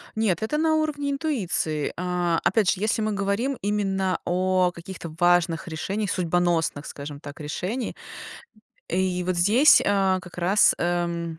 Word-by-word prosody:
Нет, 220 -4 0
это 300 +8 -1
на 315 0 +2
уровне 295 -2 -1
интуиции. 205 - -1
А, 180 -2 -1
опять 205 -2 +2
же, 195 - -3
если 220 +1 +1
мы 215 -1 -1
говорим 200 +7 -1
именно 195 -2 -1
о 185 0 +1
каких-то 170 -1 -8
важных 175 -1 +2
решениях 195 +5 -3
судьбоносных, 170 -4 0
скажем 145 0 -8
так, 145 -1 -10
решений. 185 - -4 0.9
И 180 0 0
вот 185 -1 -1
здесь, 220 - +6
а, 195 -2 +2
как 180 -1 -13
раз, 190 +4 +4
эм, 170 -1 -2
185 Hz, 140 wpm, -24 LUFS, 175-210 Hz, 0.9 s, здесь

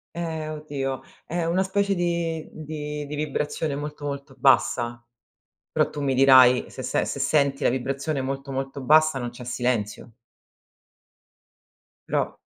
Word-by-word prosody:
Ehm, 160 -2 -3
oddio, 140 -4 -4 0.2
è 170 0 -2
una 175 +3 +2
specie 200 +1 +1
di 170 -2 -1
di 150 -1 -6
di 150 - -6
vibrazione 150 0 -2
molto, 150 0 -6
molto 140 0 -5
bassa, 120 -3 +2 0.7
però - - +2
tu 150 - -6
mi 135 -2 +1
dirai 130 -1 +7
se 130 - -7
se 125 - 0
se 140 - -4
senti 140 0 +2
la - - +5
vibrazione 135 +3 -2
molto, 135 +1 -4
molto 135 +1 -4
bassa, 155 0 +4
non 120 - -3
c'è 120 +1 -11
silenzio. 120 -3 -2 2.0
Però - - -1
140 Hz, 140 wpm, -25 LUFS, 130-155 Hz, 2.0 s, dirai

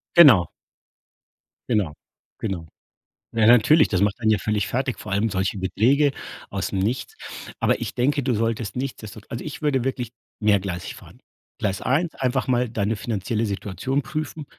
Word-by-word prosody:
Genau. 125 - +8 1.2
Genau. 105 -10 +1 0.5
Genau. 95 -6 -3 0.7
Ja, 110 -1 +4
natürlich, 125 +7 +6
das 95 -2 0
macht 105 +3 +1
einen 110 -2 +2
ja 105 - +3
völlig 105 0 0
fertig, - - -1
vor - - -7
allem 100 +3 +1
solche 95 0 -1
Beträge 130 - +3 0.4
ausm 95 - -3
Nichts. 110 +7 -2 0.4
Aber - - +2
ich - - -3
denke, 140 +2 +1
du 130 - +1
solltest 115 -2 -1
nichtsdestot 110 -5 -6
Also, 115 - -5
ich 150 - -6
würde 140 -5 +1
wirklich 125 -3 -2 0.3
mehrgleisig 100 -4 0
fahren. - - -15 0.4
Gleis 100 -3 -1
1, 155 +6 0
einfach 130 0 0
mal 125 -1 +2
deine 110 0 -1
finanzielle 110 +1 -2
Situation 105 +7 -2
prüfen. 155 0 -5
115 Hz, 150 wpm, -23 LUFS, 100-130 Hz, 1.2 s, Genau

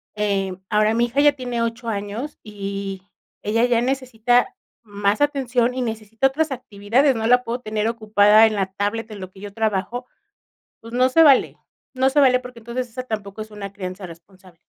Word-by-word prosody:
Eh, 200 -3 -1
ahora, 215 0 +3
mi 235 +1 +3
hija 245 +4 0
ya 290 0 +6
tiene 245 -3 -4
8 230 +1 -4
años, 215 +7 -4
y 200 -2 -5 0.4
ella 225 +3 +1
ya 240 -1 +2
necesita 245 -2 +1 0.3
más 205 -1 -1
atención, 255 -4 +1
y 260 - -2
necesita 225 +1 -1
otras 300 +3 -1
actividades, 250 +3 +1
no 225 -1 -2
la 250 +1 +4
puedo 240 +1 -3
tener 215 -1 -2
ocupada 215 -1 +5
en 215 - -2
la 195 -2 -1
tablet, 210 +3 -2
en 210 - -8
lo 185 -1 -7
que 190 - -16
yo 205 0 -7
trabajo, 220 +3 -2 0.8
pues, 230 0 -12
no 255 +1 +4
se 325 +5 +5
vale, 285 -4 +5 0.4
no 260 +1 +2
se 285 - 0
vale 255 -2 +5
porque 250 -1 -11
entonces 240 +2 -5
esa 250 +2 -6
tampoco 210 -3 -5
es 215 0 -7
una 200 -2 -7
crianza 190 -1 -7
responsable. 180 +1 -16
225 Hz, 185 wpm, -22 LUFS, 205-250 Hz, 0.8 s, ya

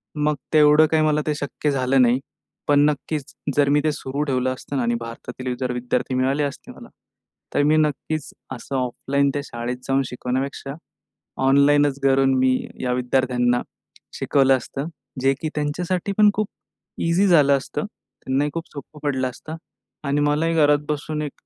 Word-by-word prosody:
मग 150 0 +1 0.2
तेवढं 150 0 +6
काही 160 -1 +3
मला 150 0 +2
ते 150 - +1
शक्य 145 +1 -2
झालं 130 0 +2
नाही. 125 +1 +4 0.5
पण 145 -1 +4
नक्कीच 150 -1 -4 0.2
जर 145 -1 +3
मी 145 0 +3
ते 155 - +2
सुरू 140 0 -4
ठेवलं 130 -2 0
असतं 135 +2 -8
ना 130 - 0
आणि 120 0 +1
भारतातील 125 +2 -6
जर 125 -1 -1
विद्यार्थी 125 +1 -2
मिळाले 135 +3 +1
असते 140 - -5
मला, - - -13 0.6
तर - - +2
मी 155 +2 +4
नक्कीच 155 0 -1 0.2
असं 130 +3 -7
ऑफलाईन 135 +3 0
त्या 145 - -1
शाळेत 120 +1 -4
जाऊन 135 0 +2
शिकवण्यापेक्षा, 130 +2 -4 0.7
ऑनलाईनच 140 0 +4
घरून 135 0 +4
मी 130 0 +3 0.3
या 125 0 0
विद्यार्थ्यांना 125 -1 +1 0.5
शिकवलं 135 -2 +3
असतं. 135 +4 -6 0.3
जे 135 +1 +3
की 155 - -2
त्यांच्यासाठीपण 180 +7 +1
खूप 215 -1 -1 0.6
इझी 185 +4 +3
झालं 145 -6 +5
असतं. 135 - -4
त्यांनाही 145 -8 -4
खूप 165 0 -5
सोपं 150 +1 -10
पडलं 130 -3 0
असतं. 155 +5 -9 0.5
आणि 145 0 0
मलाही 150 +3 +1
घरात 145 -2 +4
बसून 150 +1 -2
एक 145 -2 -4
140 Hz, 160 wpm, -22 LUFS, 130-150 Hz, 0.7 s, तेवढं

